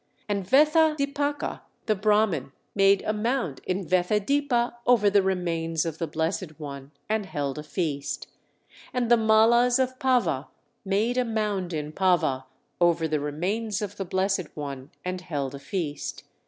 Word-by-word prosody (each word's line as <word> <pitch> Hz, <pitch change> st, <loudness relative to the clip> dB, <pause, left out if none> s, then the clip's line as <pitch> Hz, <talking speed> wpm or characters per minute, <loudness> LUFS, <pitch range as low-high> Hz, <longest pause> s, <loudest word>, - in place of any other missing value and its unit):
And 200 Hz, -2 st, -1 dB
Vethadipaka 290 Hz, 0 st, +2 dB, 0.2 s
the 215 Hz, -, +3 dB
Brahman 205 Hz, -9 st, +1 dB, 0.2 s
made 195 Hz, -1 st, +4 dB
a 215 Hz, -, 0 dB
mound 220 Hz, -, -1 dB
in 185 Hz, +1 st, -1 dB
Vethadipa 235 Hz, -, +1 dB
over 215 Hz, -5 st, +5 dB
the 200 Hz, 0 st, +5 dB
remains 170 Hz, -4 st, -1 dB
of 160 Hz, -1 st, -4 dB
the 165 Hz, -, -1 dB
Blessed 160 Hz, +1 st, -3 dB
One, 140 Hz, -2 st, -7 dB, 0.2 s
and 215 Hz, -2 st, -1 dB
held 145 Hz, -4 st, -3 dB
a -, -, -6 dB
feast. 150 Hz, -3 st, -3 dB, 0.7 s
And 245 Hz, -2 st, 0 dB
the -, -, +9 dB
Mallas 230 Hz, +3 st, +5 dB
of 260 Hz, -1 st, -1 dB
Pava 245 Hz, -, +1 dB, 0.4 s
made 215 Hz, +5 st, +1 dB
a -, -, +3 dB
mound 210 Hz, -6 st, -1 dB
in 150 Hz, -2 st, -3 dB
Pava 170 Hz, -8 st, +2 dB, 0.3 s
over 170 Hz, -2 st, +3 dB
the 155 Hz, -1 st, 0 dB
remains 190 Hz, +9 st, -2 dB
of 205 Hz, -1 st, -5 dB
the 195 Hz, -, -3 dB
Blessed 190 Hz, -1 st, 0 dB
One, 140 Hz, -2 st, -6 dB, 0.2 s
and 180 Hz, 0 st, -3 dB
held 145 Hz, -7 st, -3 dB
a 140 Hz, -, -7 dB
feast. 150 Hz, -1 st, -4 dB
195 Hz, 150 wpm, -26 LUFS, 160-225 Hz, 0.7 s, the